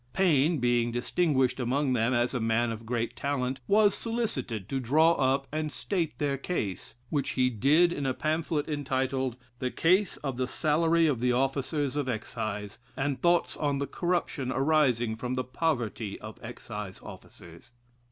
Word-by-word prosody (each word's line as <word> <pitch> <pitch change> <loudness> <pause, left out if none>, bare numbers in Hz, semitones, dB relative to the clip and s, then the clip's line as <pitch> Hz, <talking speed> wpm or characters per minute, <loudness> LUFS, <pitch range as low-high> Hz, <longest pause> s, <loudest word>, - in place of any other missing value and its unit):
Paine 165 -3 +3
being 120 -2 +2
distinguished 130 +1 +1
among 130 +2 +1
them 115 0 +2
as 120 0 +1
a 125 - 0
man 115 +1 +1
of 115 0 -7
great 115 -1 -2
talent, 130 -2 -2
was 205 0 +5
solicited 140 - -3
to 135 - -2
draw 155 +7 +4
up 135 -3 +1
and 155 0 -2
state 165 - -2
their 140 -1 -1
case, 105 - -4 0.2
which 145 -3 0
he 125 0 +3
did 150 - +4
in 145 -4 -2
a 130 - +1
pamphlet 155 -1 -1
entitled 130 -3 -1 0.2
"The 130 - -1
Case 185 +7 +2
of 135 -4 -3
the 130 0 0
Salary 165 +4 +2
of 145 -7 +1
the 125 +1 +2
Officers 135 +2 0
of 145 -3 -1
Excise, 110 -3 -4 0.2
and 135 0 -1
Thoughts 175 0 +2
on 145 -2 0
the 140 - -1
Corruption 145 -4 -1
arising 130 -6 +2
from 125 +2 -3
the 130 - -1
Poverty 125 -7 -2
of 110 0 -9
Excise 105 -4 -7
Officers." 85 +8 -13
135 Hz, 160 wpm, -28 LUFS, 120-155 Hz, 0.2 s, was